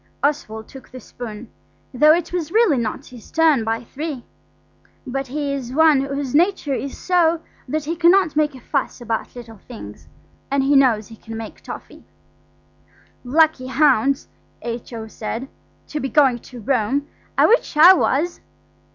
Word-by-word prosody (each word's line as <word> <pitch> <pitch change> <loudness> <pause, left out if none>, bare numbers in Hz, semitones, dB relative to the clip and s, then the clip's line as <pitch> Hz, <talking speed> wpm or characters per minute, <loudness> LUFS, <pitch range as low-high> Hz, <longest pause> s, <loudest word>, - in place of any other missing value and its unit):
Oswald 220 -7 -1
took 265 - -13
the 255 - -10
spoon, 225 -1 -9 0.4
though 300 +5 +6
it 340 +1 +1
was 335 -3 -2
really 425 - +3
not 220 -2 -3
his 245 -4 -13
turn 315 -7 +3
by 225 +1 -2
three; 280 +1 -6 0.8
but 270 +1 -3
he 285 +1 -3
is 255 -3 -5
one 310 -2 +5
whose 275 -1 -3
nature 335 -2 +2
is 275 +1 -4
so 340 -2 +2 0.3
that 305 +4 -2
he 325 +3 -3
cannot 340 -1 +4
make 300 -2 +1
a - - -10
fuss 275 +1 -2
about 230 -1 -4
little 230 -3 -11
things–and 140 - -6
he 280 +1 +3
knows 240 -6 +3
he 225 - -11
can 225 0 -9
make 225 -1 -8
toffee. - - -10 1.2
"Lucky 290 0 +2
hounds," 275 -1 +2 0.4
H.O. 230 -1 -6
said, 220 +3 -5 0.4
"to 300 - -3
be 270 - -3
going 265 -5 +3
to 245 +1 -12
Rome. 265 +4 0 0.3
I - - +6
wish 455 -8 +2
I 345 +5 +10
was." 340 -1 0
275 Hz, 155 wpm, -21 LUFS, 240-310 Hz, 1.2 s, I